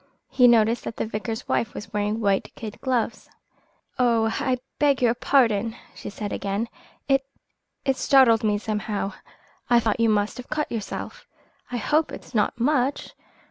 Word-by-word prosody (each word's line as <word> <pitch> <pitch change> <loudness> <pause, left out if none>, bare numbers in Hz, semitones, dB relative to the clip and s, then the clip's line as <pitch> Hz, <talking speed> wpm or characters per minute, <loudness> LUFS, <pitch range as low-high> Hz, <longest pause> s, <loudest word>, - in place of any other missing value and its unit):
He 250 -2 +6
noticed 230 0 +4
that 225 - -5
the - - -1
vicar's 220 +1 -4
wife 230 - -1
was 210 +1 -8
wearing 210 +1 -1
white 200 -3 0
kid 215 -2 -8
gloves. 245 -4 -1 0.7
"Oh, 230 -3 +3
I 260 -3 0 0.2
beg 285 -2 +3
your 240 -2 +3
pardon!" 230 -4 +2 0.2
she - - -8
said 205 0 -5
again. 205 +4 -2 0.4
"It 270 -1 +3 0.6
it 270 -1 +1
startled 250 -5 +5
me 210 -1 +2
somehow. 210 -1 -3 0.6
I 240 -1 +6
thought 225 -1 0
you 230 -1 +4
must 210 -1 +1
have 250 - -9
cut 305 0 -2
yourself. 220 -4 -6 0.4
I 245 - -2
hope 300 +7 +1
it's - - -10
not 215 +1 +1
much?" 270 +1 0
230 Hz, 160 wpm, -24 LUFS, 210-250 Hz, 0.7 s, He